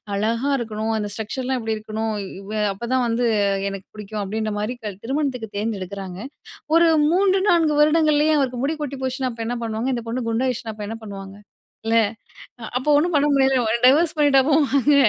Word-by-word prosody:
அழகா 230 Hz, +7 st, 0 dB
இருக்கணும். 220 Hz, -1 st, -3 dB
அந்த 210 Hz, -1 st, -2 dB
ஸ்ட்ரக்சர்லாம் 250 Hz, +4 st, -3 dB
இப்டி 220 Hz, 0 st, -1 dB
இருக்கணும். 215 Hz, +1 st, -3 dB, 0.3 s
இவே 210 Hz, +2 st, -4 dB
அப்போதான் 245 Hz, +4 st, -1 dB
வந்து 235 Hz, +1 st, +1 dB, 0.4 s
எனக்கு 195 Hz, -1 st, -8 dB
பிடிக்கும்". 210 Hz, 0 st, -5 dB
அப்படின்ற 215 Hz, +2 st, -2 dB
மாரி 215 Hz, +4 st, -2 dB
க 205 Hz, -3 st, -4 dB
திருமணத்துக்கு 260 Hz, -4 st, -2 dB
தேர்ந்தெடுக்குறாங்க. 195 Hz, -3 st, -4 dB, 0.6 s
ஒரு 335 Hz, 0 st, +6 dB, 0.2 s
3, 380 Hz, +1 st, +3 dB
4 325 Hz, -3 st, +3 dB
வருடங்கள்லேயே 305 Hz, 0 st, +4 dB
அவருக்கு 255 Hz, -3 st, -1 dB
முடி 310 Hz, +3 st, 0 dB
கொட்டி 280 Hz, -1 st, -4 dB
போச்சுனா 260 Hz, 0 st, -1 dB
அப்ப 230 Hz, -, -6 dB
என்ன 245 Hz, -, -2 dB
பண்ணுவாங்க. 225 Hz, +2 st, -2 dB
இந்த 235 Hz, -, -3 dB
பொண்ணு 250 Hz, +3 st, -2 dB
குண்டாயிடுச்சுனா 230 Hz, -1 st, -1 dB
அப்ப 210 Hz, -1 st, -7 dB
என்ன 225 Hz, -, -5 dB
பண்ணுவாங்க. 195 Hz, -1 st, -8 dB, 0.5 s
இல்ல 225 Hz, 0 st, +2 dB, 0.8 s
அப்போ 260 Hz, +4 st, -2 dB
ஒண்ணும் 345 Hz, +4 st, +1 dB
பண்ண 290 Hz, 0 st, +4 dB
முடியாதுல. 265 Hz, -4 st, +3 dB
டைவோர்ஸ் 310 Hz, +5 st, +4 dB
பண்ணிட்டா 290 Hz, -2 st, +5 dB
போவாங்க! 285 Hz, -2 st, +3 dB
240 Hz, 165 wpm, -22 LUFS, 215-280 Hz, 0.8 s, ஒரு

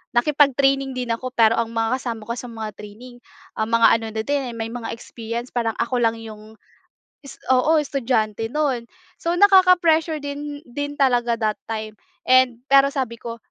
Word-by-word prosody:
nakipag-training 275 Hz, 0 st, +2 dB
din 250 Hz, -2 st, -4 dB
ako 255 Hz, +3 st, -5 dB
pero 225 Hz, -1 st, +4 dB
ang 230 Hz, -1 st, -1 dB
mga 225 Hz, +3 st, 0 dB
kasama 230 Hz, -4 st, -5 dB
ko 235 Hz, -, 0 dB
sa 245 Hz, -, -7 dB
mga 220 Hz, -2 st, -6 dB
training, 230 Hz, +4 st, -12 dB, 0.4 s
ah, 220 Hz, -, 0 dB
mga 230 Hz, +1 st, +4 dB
ano 225 Hz, -, -7 dB
na 220 Hz, -, -2 dB
din 275 Hz, -1 st, -2 dB
may 225 Hz, 0 st, -4 dB
mga 235 Hz, -1 st, -5 dB
experience 230 Hz, +1 st, -7 dB
parang 230 Hz, -2 st, -1 dB
ako 245 Hz, +2 st, -1 dB
lang 230 Hz, -1 st, +2 dB
'yong 215 Hz, -1 st, -11 dB, 1.0 s
oo, 260 Hz, +5 st, +3 dB
estudyante 230 Hz, -6 st, -1 dB
no'n. 270 Hz, -5 st, -1 dB, 0.4 s
So 335 Hz, -, -1 dB
nakaka-pressure 350 Hz, -5 st, +4 dB
din 290 Hz, 0 st, -6 dB
din 285 Hz, +4 st, -5 dB
talaga 240 Hz, -3 st, +2 dB
that 215 Hz, -1 st, 0 dB
time 215 Hz, -1 st, -5 dB, 0.3 s
and 255 Hz, -2 st, +4 dB
pero 275 Hz, 0 st, +5 dB
sabi 235 Hz, -4 st, -3 dB
ko, 235 Hz, -1 st, -6 dB
240 Hz, 165 wpm, -22 LUFS, 225-275 Hz, 1.0 s, pero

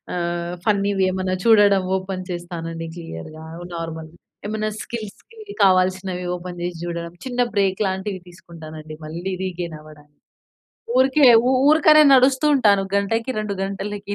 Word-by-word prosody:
ఆహ్, 175 Hz, 0 st, -3 dB
ఫన్నీవి 200 Hz, -2 st, +1 dB
ఏమన్నా 185 Hz, 0 st, -2 dB
చూడడం 205 Hz, -4 st, +5 dB
ఓపెన్ 185 Hz, -1 st, -6 dB
చేస్తానండి. 165 Hz, -1 st, -6 dB
క్లియర్‌‌‌‌‌‌‌గా, 155 Hz, -, -9 dB, 0.3 s
నార్మల్‌‌‌‌‌‌ 165 Hz, 0 st, -7 dB, 0.3 s
ఏమన్నా 215 Hz, 0 st, -2 dB
స్కిల్స్‌కి 235 Hz, -, -9 dB, 0.2 s
కావాల్సినవి 185 Hz, -1 st, +2 dB
ఓపెన్ 175 Hz, 0 st, -8 dB
చేసి 175 Hz, -1 st, -4 dB
చూడడం, 170 Hz, 0 st, -5 dB
చిన్న 250 Hz, -1 st, -1 dB
బ్రేక్ 195 Hz, -2 st, +1 dB
లాంటివి 190 Hz, +1 st, -3 dB
తీసుకుంటానండి. 155 Hz, -3 st, -11 dB
మళ్ళీ 170 Hz, +5 st, -5 dB
రీగైన్ 175 Hz, -3 st, -4 dB
అవ్వడానికి. 150 Hz, -1 st, -17 dB, 0.8 s
ఊరికే, 265 Hz, +3 st, +3 dB, 0.4 s
ఊరికనే 305 Hz, 0 st, +6 dB
నడుస్తూ 260 Hz, +3 st, +3 dB
ఉంటాను. 205 Hz, -7 st, +4 dB
గంటకి, 225 Hz, +5 st, 0 dB
2 210 Hz, -1 st, -3 dB
గంటలకి, 200 Hz, +1 st, -5 dB
185 Hz, 120 wpm, -21 LUFS, 170-205 Hz, 0.8 s, ఊరికనే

